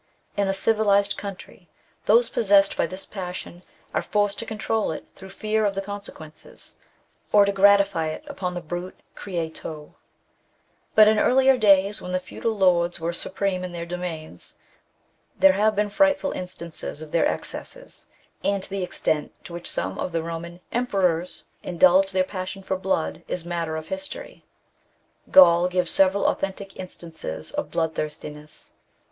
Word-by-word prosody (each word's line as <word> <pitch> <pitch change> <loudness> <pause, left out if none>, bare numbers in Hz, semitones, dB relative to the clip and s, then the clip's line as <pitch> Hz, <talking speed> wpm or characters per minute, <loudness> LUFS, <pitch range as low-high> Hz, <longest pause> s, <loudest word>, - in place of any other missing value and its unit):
In 200 -1 +1
a - - +2
civilized 200 -1 +3
country 195 -3 -9 0.4
those 230 +3 +5
pos 220 - -2
sessed 200 -1 +5
by - - +1
this 185 +1 -8
passion 180 -2 -7 0.3
are - - +1
forced 205 -1 0
to - - -5
control 220 -1 -1
it 155 - -6
through 190 - -11
fear 215 +2 -1
of 200 -1 +1
the 195 - -1
consequences, 195 -6 -10 0.5
or 205 -1 +6
to 200 - +1
gratify 200 -4 +4
it 155 - -5
upon 185 -11 -4
the 175 - -4
brute 175 +3 -6
creation. 160 -4 -6 1.0
But 215 -1 +8
in 215 0 +4
earlier 265 +1 +5
days, 200 -3 +4
when 180 0 -2
feudal 220 +4 -4
lords 175 -3 +3
were 165 +1 -2
supreme 185 +1 -2
in 180 -1 -6
their 170 -1 -5
domains, 170 - -6 0.8
there 195 -1 +6
have 215 +2 +2
been 205 0 0
frightful 285 +3 +2
instances 170 -4 -6
of 155 - -11
their 170 - +3
excesses, - - -6 0.4
and 200 -1 0
the 195 0 -4
extent 155 -4 -2
to 170 - -9
which 170 0 -4
some 95 +2 -2
of 180 - -3
the 165 - 0
Boman 170 +1 -6
emperors 185 -8 0 0.2
indulged 185 +2 +4
their 185 -1 +2
passion 185 +1 -6
for 190 - -1
blood 190 -3 -1
is 175 -2 -4
matter 170 -2 -3
of 160 0 -6
histor}\ 285 0 -6 0.9
Gall 175 -11 +7
gives 180 -1 0
several 195 +1 +5
authentic 195 0 -2
instances 160 - -6
of - - -3
blood 160 0 -1
thirstiness. 150 0 -7
185 Hz, 155 wpm, -24 LUFS, 170-200 Hz, 1.0 s, But